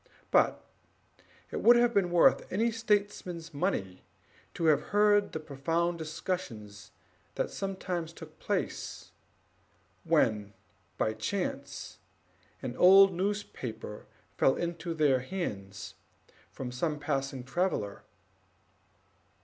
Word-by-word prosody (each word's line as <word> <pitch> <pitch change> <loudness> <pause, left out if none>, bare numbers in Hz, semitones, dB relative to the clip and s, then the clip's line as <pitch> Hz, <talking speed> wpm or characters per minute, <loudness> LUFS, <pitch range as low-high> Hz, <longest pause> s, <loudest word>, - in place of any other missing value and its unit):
But - - +3 0.9
it - - -3
would 240 - +8
have 240 0 +4
been 195 -4 +2
worth 175 -1 +4
any 225 +5 +1
statesman's 205 -7 -1
money 140 - -2 0.5
to 165 - -1
have 155 -2 +5
heard 205 0 +4
the 160 - -4
profound 165 +4 -1
discussions 115 - -5 0.5
that - - -1
sometimes 185 -4 -3
took - - -13
place, - - -3 0.9
when 110 -10 +2 0.4
by 110 - +1
chance 175 - -4 0.6
an 125 -2 -4
old 195 +1 +8
newspaper 180 - -4 0.3
fell 135 - +4
into 170 0 -3
their 145 -5 +3
hands 105 - -5 0.6
from 125 -2 -6
some 150 +5 -1
passing 135 -3 -2
traveller. 130 - -1
165 Hz, 100 wpm, -30 LUFS, 130-190 Hz, 0.9 s, would